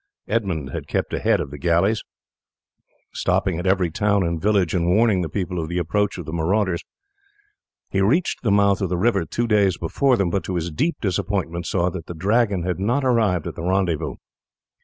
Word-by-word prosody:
Edmund 95 - -1
had - - -5
kept - - -2
ahead - - +2
of 70 - -4
the 75 - -8
galleys, 85 +8 +2 1.1
stopping 80 - 0
at 90 - -3
every 95 -3 +2
town 100 +2 +1
and 85 -1 -2
village 100 -5 +2
and 85 -1 +1
warning 105 0 +3
the 85 - -3
people 90 0 -3
of 80 -1 -4
the 85 - -2
approach 100 +5 0
of 90 - -6
the 80 - -6
marauders. 90 +2 0 1.1
He 95 - +1
reached 145 - +1
the 115 - 0
mouth 100 -1 +3
of 95 - 0
the 90 - -1
river 100 -2 +2
two 120 +9 -2
days 100 -5 +2
before 125 +10 +1
them, 95 -5 0
but 100 - -1
to 95 - -3
his 85 0 -2
deep 155 - 0
disappointment 95 -4 -2
saw 90 -1 +1
that 85 -3 -7
the 85 - -7
Dragon 100 +1 +1
had 90 -1 -2
not 120 +8 +1
arrived 110 - +2
at - - -4
the - - -8
rendezvous. 90 -3 0
95 Hz, 200 wpm, -22 LUFS, 85-105 Hz, 1.1 s, warning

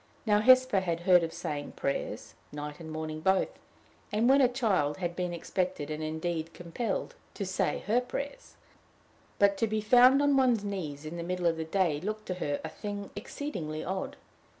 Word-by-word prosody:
Now, 210 -2 +4
Hesper 255 -1 +6
had 170 -3 -2
heard 180 0 +6
of 165 -1 -2
saying 155 -4 -5
prayers 140 - -3 0.2
night 150 0 -6
and 160 -1 -8
morning 155 0 -4
both 190 - +2 0.6
and, 215 +3 +2
when 275 +2 +6
a 255 - +6
child, 210 - +1
had 175 -2 -3
been 180 -1 -2
expected, 175 -2 -2
and 155 0 -4
indeed 160 +1 -3
compelled, 190 +5 -3 0.2
to 200 - -3
say 190 0 -1
her 225 +5 +3
prayers; 280 +3 -6 0.8
but 200 -1 +4
to 225 - +1
be 215 0 -1
found 250 +5 +6
on 285 -1 +3
one's 245 -5 +3
knees 160 -8 -4
in 160 +3 -6
the - - -3
middle 180 +1 -2
of 165 -1 +3
the 160 - -3
day 160 -3 +1
looked 215 +3 -4
to 185 - -2
her 145 -1 -1
a 160 - -4
thing 205 +3 -6
exceedingly 160 - -5
odd. 190 +1 -3
185 Hz, 185 wpm, -30 LUFS, 160-215 Hz, 0.8 s, Hesper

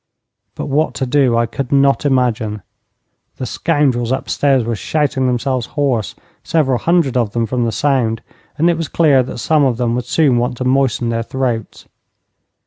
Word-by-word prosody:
But - - -5
what 145 +3 0
to 135 - -2
do 130 -2 +2
I 115 - +2
could 125 +2 -5
not 140 -1 +3
imagine. 115 -6 0 0.7
The 130 - -4
scoundrels 130 -4 0
upstairs 135 0 +1
were 115 0 -2
shouting 135 +2 -1
themselves 125 0 -1
hoarse, 130 -8 0 0.3
several 135 -6 +1
hundred 170 -7 +1
of 115 -4 0
them 115 -1 0
from 120 +1 -1
the 115 - -1
sound, 120 -4 0 0.3
and 165 - +2
it 170 -1 +2
was 165 -2 -3
clear 145 -5 +3
that 125 - -6
some 150 +5 +2
of 130 -4 +1
them 120 -1 0
would 125 0 -2
soon 135 -3 +2
want 125 +1 -2
to 125 - -3
moisten 130 -3 +1
their 115 0 -1
throats. 120 -2 -3
130 Hz, 175 wpm, -17 LUFS, 120-140 Hz, 0.7 s, not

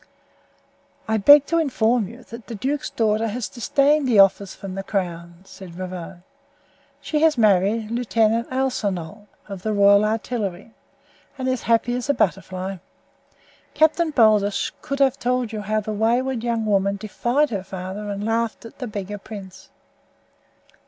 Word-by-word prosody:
"I 220 0 +1
beg 285 +7 +7
to 335 +2 +1
inform 240 - +1
you 240 +5 -12
that 230 0 -11
the 235 - -6
duke's 275 +7 -2
daughter 220 0 0
has 230 +2 -3
disdained 280 +3 +1
the 235 -4 +3
offer 195 0 +5
from 190 0 -8
the 195 - -4
crown," 175 -3 -4
said 190 -3 -12
Ravone. 185 -1 -7 0.8
"She 300 -1 -1
has 315 -3 +4
married 215 +1 +2
Lieutenant 230 -1 +1
Alsanol, 205 -7 -3 0.2
of 195 -3 -7
the 215 +2 -2
royal 200 0 +5
artillery, 215 -2 -3 0.6
and 260 -1 -3
is 260 - +2
as 255 - -4
happy 230 +1 +2
as 250 +3 -4
a 285 - +3
butterfly. 190 0 -2 1.0
Captain 320 +1 +3
Baldos 215 -7 +3
could 275 -2 -4
have 275 -1 +2
told 250 -2 -1
you 215 -1 -4
how 215 +1 -1
the 215 +1 -5
wayward 235 +3 0
young 230 -2 -1
woman 200 -1 +1
defied 240 +8 -1
her 200 -4 -3
father 190 +2 -6
and 200 0 -4
laughed 230 0 -1
at 230 - -13
the 250 - -4
beggar 205 -1 -6
prince." 195 -2 -11
220 Hz, 155 wpm, -22 LUFS, 195-245 Hz, 1.0 s, beg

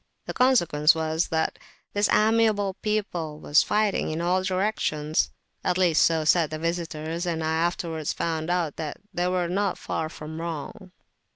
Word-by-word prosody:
The - - -5
consequence 175 - +4
was, 160 +1 0
that 160 0 -1 0.3
this 205 0 +2
amiable 215 -2 +3
people 180 -8 -2
was 150 0 +4
fighting 210 -1 +1
in 155 +1 -3
all 180 +2 +1
directions. 185 -5 0 0.3
At 180 - +1
least 175 -4 +4
so 160 -2 +2
said 160 0 +4
the 155 - -4
visitors, 165 0 -3
and 165 -2 -1
I 160 0 0
afterwards 165 -2 -1
found 160 -1 -2
out 175 -4 0
that 155 -3 -4 0.2
they 175 0 0
were 180 -1 0
not 195 +2 0
far 155 - -3
wrong. 160 +3 -6
170 Hz, 155 wpm, -25 LUFS, 160-185 Hz, 0.3 s, consequence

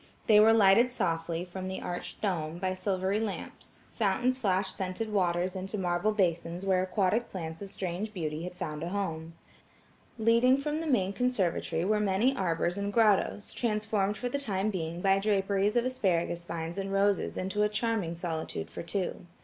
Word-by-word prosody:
They 210 -2 +6
were 220 +1 +7
lighted 225 +3 +5
softly, 165 -4 -1
from 185 +1 -6
the 190 - -4
arched 175 0 -6
dome, 170 -5 -1
by 185 +1 -1
silvery 190 +1 0
lamps; 220 -3 -6
fountains 235 +4 +1
flashed 195 -6 0
scented 190 +4 -3
waters 180 -1 +1
into 190 +3 -4
marble 180 +2 +1
basins 175 -2 -1
where 190 -1 +3
aquatic 195 +4 0
plants 165 -2 -6
of 200 - -6
strange 190 +3 -4
beauty 160 -5 -3
had 180 +1 -6
found 150 -3 -5
a 170 - -3
home. 165 -4 -3 0.8
Leading 235 +4 +4
from 300 +2 -2
the 325 - -4
main 200 -9 +2
conservatory 190 -8 0
were 210 +2 +2
many 210 +6 +2
arbors 175 -2 0
and 200 0 -2
grottoes, 210 -1 +2
transformed 210 -3 0
for 250 - -3
the 280 +3 -2
time 210 -5 -1
being 170 -2 -4
by 195 0 +4
draperies 200 +1 +1
of 240 0 +3
asparagus 175 -8 0
vines 170 +2 -4
and 195 0 -3
roses 200 0 +1
into 195 +3 -1
a 210 - +3
charming 210 -6 -1
solitude 160 - -4
for - - -6
two. 175 0 -3
195 Hz, 175 wpm, -30 LUFS, 175-215 Hz, 0.8 s, were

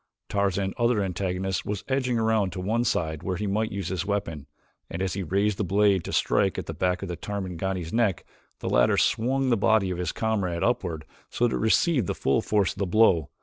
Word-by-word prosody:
Tarzan's 100 -1 0
other 120 -3 +2
antagonist 95 0 -2
was 105 -1 -4
edging 130 -3 0
around 110 -4 +1
to 90 - -5
one 110 +6 0
side 80 -9 -1
where 90 +1 -2
he 105 +4 -3
might 110 +2 -1
use 95 -3 -4
his 90 -2 -2
weapon, 95 -8 -3 0.4
and 85 - -5
as 95 -1 -1
he 100 - -3
raised 100 +3 0
the - - +1
blade 100 -1 +2
to - - -5
strike - - +1
at - - -4
the - - -5
back 90 +1 -1
of - - -4
the 90 - -4
Tarmangani's 95 -3 -4
neck, 110 -7 +1 0.4
the - - -4
latter - - +3
swung 130 +3 +1
the 115 - +3
body 100 -2 +2
of 90 - -4
his 90 -3 -1
comrade 100 -6 -1
upward 85 -10 -1 0.2
so 120 - +1
that 115 - -3
it - - -2
received 120 - +2
the - - -2
full 70 - +1
force 105 -3 +1
of - - -14
the 100 - 0
blow. 90 -6 +3
100 Hz, 220 wpm, -26 LUFS, 90-110 Hz, 0.4 s, latter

